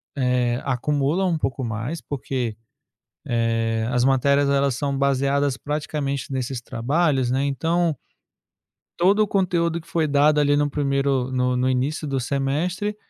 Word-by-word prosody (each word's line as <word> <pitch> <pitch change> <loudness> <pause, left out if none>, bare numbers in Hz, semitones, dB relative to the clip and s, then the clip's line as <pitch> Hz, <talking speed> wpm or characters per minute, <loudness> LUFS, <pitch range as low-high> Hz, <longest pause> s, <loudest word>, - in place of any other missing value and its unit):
eh, 125 -2 +1
acumula 145 +6 0
um 175 -3 +1
pouco 135 -3 -2
mais, 115 +7 -3
porque, 125 -5 -4 0.7
eh, 115 -1 0
as 125 -1 +2
matérias; 140 +2 +3
elas 140 -1 +2
são 140 0 -2
baseadas 140 0 +1
praticamente 145 -2 -3
nesses 130 -1 -3
trabalhos, 135 +2 0
né. 135 +2 +1
Então 165 +3 0 1.0
todo 195 +5 +4
o 210 - +3
conteúdo 170 -4 0
que 165 - -19
foi 160 -2 +1
dado 145 +1 +3
ali 145 0 +3
num 145 0 +2
1º, 140 -2 0
no 125 0 +1
no 125 +1 +1
início 140 +5 -1
do 135 -2 -1
semestre, 150 +11 -1
140 Hz, 140 wpm, -23 LUFS, 125-150 Hz, 1.0 s, todo